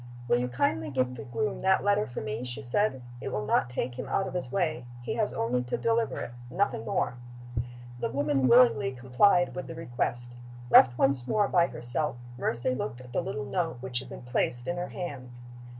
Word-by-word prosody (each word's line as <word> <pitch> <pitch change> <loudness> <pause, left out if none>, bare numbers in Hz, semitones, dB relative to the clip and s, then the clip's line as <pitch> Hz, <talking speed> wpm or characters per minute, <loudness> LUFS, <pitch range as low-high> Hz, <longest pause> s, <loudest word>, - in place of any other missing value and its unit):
"Will 120 - +3
you 125 - 0
kindly 125 -4 0
give 130 -2 0
the 125 - -8
groom 210 - -2
that 190 0 +3
letter 205 +1 +2
for 120 - -5
me?" 110 +2 -4
she 125 +3 -5
said. 130 - 0 0.2
"It - - -4
will 105 0 -2
not 120 - +2
take 125 0 -3
him - - -5
out 195 - +1
of - - -6
his 175 -9 -3
way. 155 -9 -1 0.2
He - - -2
has 215 -2 0
only 120 +2 0
to 125 - -2
deliver 230 0 +1
it - - -5 0.2
nothing 175 - 0
more." 120 - 0 0.8
The - - -1
woman 140 -2 +1
willingly 125 +2 +5
complied 130 +9 +3
with 180 - -5
the 165 - -7
request. 120 -5 -3 0.4
Left 120 -1 +8
once 135 -2 +3
more 205 +4 +2
by 175 -3 +4
herself, 120 +2 -2 0.2
Mercy 120 +1 +1
looked 120 -1 -4
at 125 -1 -12
the - - +1
little 140 0 -4
note 165 0 -1
which 125 -1 -1
had 130 0 -9
been - - -9
placed 125 0 -1
in 175 - -1
her 175 0 -2
hands. 125 -8 -7
130 Hz, 205 wpm, -29 LUFS, 120-175 Hz, 0.8 s, Left